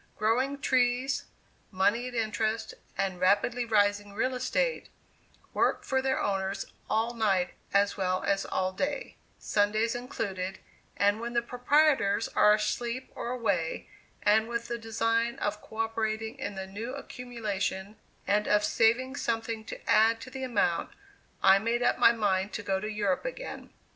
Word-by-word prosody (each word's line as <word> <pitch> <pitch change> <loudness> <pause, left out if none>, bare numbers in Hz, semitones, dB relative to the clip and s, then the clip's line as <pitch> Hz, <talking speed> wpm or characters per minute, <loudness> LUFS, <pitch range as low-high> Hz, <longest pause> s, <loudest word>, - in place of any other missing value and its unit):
Growing 260 +6 +1
trees, 255 0 +1 0.4
money 205 +6 +1
at 250 - -7
interest, 220 0 -1 0.2
and 190 -2 -1
rapidly 205 +6 +2
rising 205 -2 +2
real 255 +5 0
estate, 475 - -1 0.6
work - - +1
for 265 -1 0
their 265 0 0
owners 195 0 -1 0.2
all 225 +2 +1
night 195 -6 +1 0.2
as 200 +1 +2
well 185 -1 0
as 195 -1 +1
all 185 0 -1
day, 280 +7 -3 0.2
Sundays 215 +2 +1
included, 195 -6 -4 0.4
and 205 +1 +3
when 235 +1 -4
the 235 - +2
proprietors 245 -4 +2
are 210 0 +5
asleep 235 +3 -2
or - - -5
away, 200 -10 -1 0.4
and 220 +2 +4
with 235 0 -3
the 235 0 -3
design 230 +1 0
of 210 -4 -2
coöperating 220 0 -2
in 205 - -4
the 190 0 -4
new 220 +7 -6
accumulation 215 -7 -4 0.3
and 210 +1 +1
of 210 0 +3
saving 245 +5 +2
something 225 -3 -2
to - - -9
add 225 +1 +4
to 255 - -10
the 265 0 -6
amount, 205 -9 +1 0.5
I 195 0 +7
made 235 +3 0
up - - +2
my - - +7
mind 205 -3 0
to 225 - -4
go 195 -1 0
to 210 +2 -4
Europe 205 -3 0
again. - - -6
220 Hz, 150 wpm, -29 LUFS, 200-240 Hz, 0.6 s, I